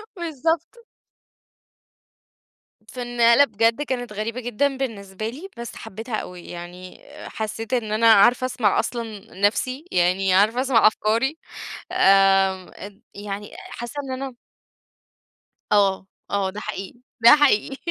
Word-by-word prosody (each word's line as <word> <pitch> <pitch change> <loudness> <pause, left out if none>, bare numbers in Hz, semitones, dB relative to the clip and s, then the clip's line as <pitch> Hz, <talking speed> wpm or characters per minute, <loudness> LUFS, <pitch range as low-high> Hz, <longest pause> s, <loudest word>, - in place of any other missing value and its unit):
بالضبط. 330 - -2 2.2
فالنقلة 240 +1 +4
بجد 225 +4 +1
كانت 245 -6 -4
غريبة 220 +4 -4
جدًا 265 +4 -1
بالنسبة 215 -4 -5
لي، 320 +11 -9
بس 235 -1 -7
حبيتها 225 +3 -6
أوي، 180 -4 -7
يعني 175 +1 -10 0.3
حسيت 225 +2 -5
إن 220 -4 -1
أنا 225 +1 +5
عارفه 240 +5 +5
اسمع 225 -5 +1
أصلًا 225 -3 -5
نَفسي، 255 +8 0
يعني 185 +2 +2
عارفه 215 +6 +3
اسمع 250 -5 +4
أفكاري 230 +8 0 0.5
آمم، 195 -1 +3
اد 200 0 -11
يعني 205 0 -7 0.2
حاسة 240 +2 -7
إن 265 - -7
أنا 265 -3 -6 1.4
آه 195 -2 +2 0.2
آه، 200 -1 0
ده 205 +2 -7
حقيقي، 210 +2 -7 0.2
ده 235 +5 +10
حقيقي 270 -2 +2
225 Hz, 115 wpm, -23 LUFS, 200-250 Hz, 2.2 s, ده